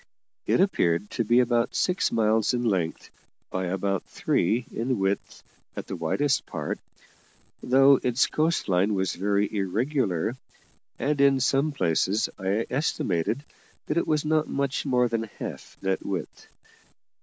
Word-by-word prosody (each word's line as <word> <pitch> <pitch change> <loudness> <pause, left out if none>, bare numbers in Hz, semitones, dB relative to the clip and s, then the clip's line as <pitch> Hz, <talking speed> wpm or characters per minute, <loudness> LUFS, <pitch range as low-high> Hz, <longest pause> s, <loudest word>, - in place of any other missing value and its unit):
It - - +3
appeared 105 - +1
to 115 - -1
be 120 +3 +4
about 120 -1 +1
six 180 0 +1
miles 110 +1 +2
in 120 - -1
length 95 -8 -1 0.4
by 95 0 -2
about 95 +1 -1
three 115 +8 0
in 120 +2 -1
width 95 0 -2 0.3
at - - -5
the - - -5
widest 130 - 0
part, - - -4 0.8
though 135 +2 +5
its 125 +1 +2
coast 160 +2 0
line 95 +2 +2
was 95 -1 0
very 100 +2 0
irregular, 105 - 0 0.6
and, 145 0 0
in 140 -1 +5
some 135 +4 +2
places, 95 - +1
I 100 +4 0
estimated 125 - -1 0.4
that - - -2
it 170 - +1
was 155 -1 +1
not 155 0 +2
much 140 +1 -2
more 125 -2 +3
than 115 -2 -2
half - - -7
that 95 0 -1
width. 95 -2 -5
115 Hz, 145 wpm, -26 LUFS, 95-135 Hz, 0.8 s, though